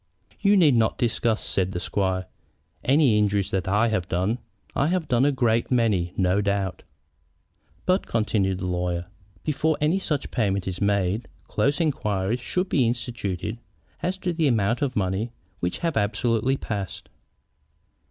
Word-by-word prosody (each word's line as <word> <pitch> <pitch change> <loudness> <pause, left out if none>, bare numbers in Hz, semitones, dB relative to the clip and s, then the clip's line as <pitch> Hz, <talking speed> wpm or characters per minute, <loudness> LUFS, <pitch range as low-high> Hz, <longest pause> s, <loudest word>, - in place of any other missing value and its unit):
"You 205 -1 +4
need 160 -7 +6
not 115 -1 +2
discuss," 115 -1 0
said 95 0 -1
the 90 - -2
squire, 95 -1 -1 0.6
"any 130 -5 +4
injuries 100 -2 +1
that 95 0 -1
I 105 +4 +3
have 95 -6 -1
done. 95 +8 0 0.4
I 140 - +2
have 175 -1 0
done 125 +1 +3
a 145 - +4
great 115 -4 +1
many, 105 -8 +2
no 95 +1 +2
doubt." 100 -2 -1 1.0
"But," 185 +2 +2
continued 105 -4 +1
the 90 - -4
lawyer, 90 -1 -1 0.4
"before 155 0 +1
any 155 +5 +2
such 150 -7 -2
payment 100 -4 0
is 95 +1 -4
made, 100 +1 +1 0.2
close 140 0 +1
inquiries 110 - 0
should 180 +9 -1
be 135 -9 +2
instituted 115 -3 -3 0.4
as 185 +2 -1
to 180 -2 -2
the 165 -2 +2
amounts 115 -1 +1
of 135 -4 0
money 100 +4 -1 0.3
which 90 0 -1
have 165 -3 0
absolutely 115 +4 +1
passed." 100 -7 -5
110 Hz, 150 wpm, -25 LUFS, 95-135 Hz, 1.0 s, need